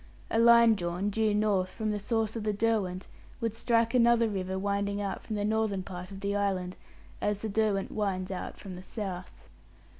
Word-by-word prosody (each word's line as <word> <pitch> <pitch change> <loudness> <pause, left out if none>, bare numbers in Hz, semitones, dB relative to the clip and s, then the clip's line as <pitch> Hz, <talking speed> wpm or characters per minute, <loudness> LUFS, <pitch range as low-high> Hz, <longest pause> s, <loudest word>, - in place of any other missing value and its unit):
A 225 - +2
line 235 -1 +7
drawn 180 +1 -2
due 220 +1 +2
north 205 -3 +2
from 215 +1 -2
the 210 - -2
source 225 +1 -1
of 225 - -3
the 210 -1 0
Derwent 200 -4 0 0.3
would 230 -3 -1
strike 230 0 +1
another 235 -1 +5
river 190 -2 -2
winding 200 +1 -1
out 200 -1 -3
from 215 - -5
the 205 0 -1
northern 215 -3 0
part 180 -1 -7
of 195 -1 -9
the 200 0 -1
island, 190 -3 -1 0.5
as 205 0 -1
the 220 - -1
Derwent 205 -2 0
winds 195 -3 -2
out 185 - -5
from 190 -3 -8
the 180 - -8
south. 185 -2 -7
205 Hz, 190 wpm, -29 LUFS, 190-220 Hz, 0.5 s, line